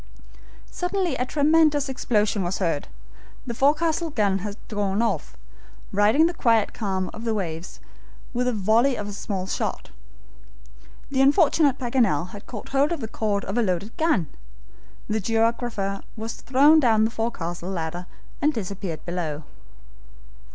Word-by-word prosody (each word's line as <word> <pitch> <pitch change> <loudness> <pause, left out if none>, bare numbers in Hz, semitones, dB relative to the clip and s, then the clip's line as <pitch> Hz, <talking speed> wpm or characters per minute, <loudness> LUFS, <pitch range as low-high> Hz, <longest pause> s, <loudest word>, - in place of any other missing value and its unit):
Suddenly 360 -1 -1
a 250 - -2
tremendous 300 -1 +3
explosion 215 -6 0
was 180 +1 -1
heard. 165 -6 -1 0.6
The 235 - -4
forecastle 315 +6 +2
gun 205 -8 +1
had 205 +1 -5
gone 205 -2 -1
off, 230 0 -1 0.5
riddling 210 +10 +4
the 340 - +1
quiet 230 -8 +2
calm 190 -4 -2
of 220 - -8
the 225 -2 0
waves 170 -3 -5 0.5
with 250 +1 0
a - - +3
volley 225 +5 +3
of 205 0 -5
small 195 -2 -3
shot. - - -3 1.2
The 265 -1 +2
unfortunate 285 -1 +4
Paganel 230 - +1
had 200 +1 -11
caught 215 -4 -8
hold 275 +3 +2
of 340 - -1
the 225 - -4
cord 210 -2 -1
of 195 - -4
the 240 - +2
loaded 200 +1 -2
gun. 320 - +2 0.8
The 215 +1 0
geographer 225 -2 0 0.2
was 225 +1 -4
thrown 285 +4 +5
down 225 -6 +4
the 225 - -1
forecastle 180 -7 -3
ladder 175 -1 -4 0.3
and 300 - +3
disappeared 195 - -5
below. 165 -4 -3
220 Hz, 145 wpm, -24 LUFS, 195-270 Hz, 1.2 s, thrown